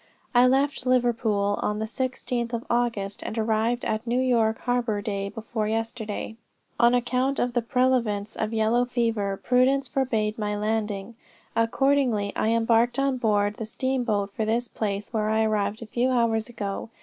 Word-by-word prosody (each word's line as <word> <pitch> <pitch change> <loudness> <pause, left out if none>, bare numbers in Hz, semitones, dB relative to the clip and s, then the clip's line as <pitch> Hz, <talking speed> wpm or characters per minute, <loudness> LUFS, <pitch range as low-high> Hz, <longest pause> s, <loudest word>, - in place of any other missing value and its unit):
"I 245 +1 +6
left 270 0 +1
Liverpool 225 -5 +1
on 210 - -1
the 220 - -2
16th 245 0 -3
of 235 0 -3
August, 230 -5 -1
and 220 - -5
arrived 225 +2 0
at 220 +1 -2
New 240 +2 +1
York 230 -4 +2
harbor 245 -4 0
day 200 -2 -3
before 220 0 -3
yesterday. 225 0 -3 0.4
On 240 +1 +5
account 250 +3 0
of 245 0 0
the 240 - +2
prevalence 235 -4 0
of 215 0 -2
yellow 225 +2 +2
fever, 230 -5 -1
prudence 260 +2 +3
forbade 230 -4 -1
my 210 -1 -1
landing. 215 0 -2 0.4
Accordingly 230 -3 +2
I - - 0
embarked 230 +1 +2
on 275 -1 +1
board 205 -3 +1
the 225 - -4
steamboat 235 -5 -1
for 220 - -2
this 230 +3 0
place, 210 -1 -4
where 215 -1 0
I 220 0 +2
arrived 215 0 0
a - - -8
few 240 +3 0
hours 230 -3 +1
ago. 205 -2 -5
230 Hz, 160 wpm, -25 LUFS, 215-245 Hz, 0.4 s, I